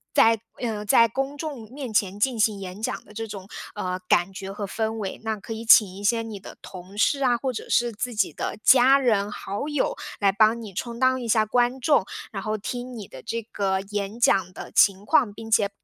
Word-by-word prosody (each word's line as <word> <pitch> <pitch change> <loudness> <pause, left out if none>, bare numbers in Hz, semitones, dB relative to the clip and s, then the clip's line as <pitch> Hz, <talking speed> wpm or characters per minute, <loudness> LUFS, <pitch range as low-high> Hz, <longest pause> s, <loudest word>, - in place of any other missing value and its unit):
在 225 -1 +5 0.2
呃， 220 -4 -3
在 230 +3 +5
公 270 +5 -3
众 270 -8 -6
面 260 -5 -6
前 200 -1 0
进 235 +1 +1
行 210 -2 +2
演 190 +2 -8
讲 - - -3
的 210 - -16
这 225 +1 -5
种， 195 -2 -8 0.3
呃， 185 -2 -3
感 175 +2 +3
觉 195 0 -7
和 205 0 -5
氛 220 +2 -2
围。 210 -3 -5
那 220 -1 -1
可 225 - -7
以 225 +1 -6
请 220 -2 +7
一 200 - -9
些 230 +2 +2
你 215 -3 -7
的 - - -12
同 185 +2 -11
事 275 +5 +2
啊， 245 -2 +3
或 260 0 -2
者 - - -7
是 240 0 +2
自 230 +2 -4
己 - - +1
的 - - -4
家 265 +1 +7
人、 215 -6 +1
好 205 +10 -5
友 295 -3 0 0.2
来 200 -2 +4
帮 220 +3 +3
你 210 -4 -9
充 235 +5 -5
当 260 0 +2
一 235 - -5
下 215 -1 +3
观 245 +3 +1
众， 285 -3 +3 0.3
然 195 - -5
后 215 +2 -2
听 245 +4 -6
你 205 -4 -8
的 130 - -11
这 230 0 -4
个 195 -3 -1
演 205 +2 -3
讲 190 -5 +3
的 - - -9
情 195 -1 +4
况， 215 -3 +3
并 225 +1 -9
且， 205 -2 +3
220 Hz, 245 characters per minute, -24 LUFS, 200-240 Hz, 0.3 s, 请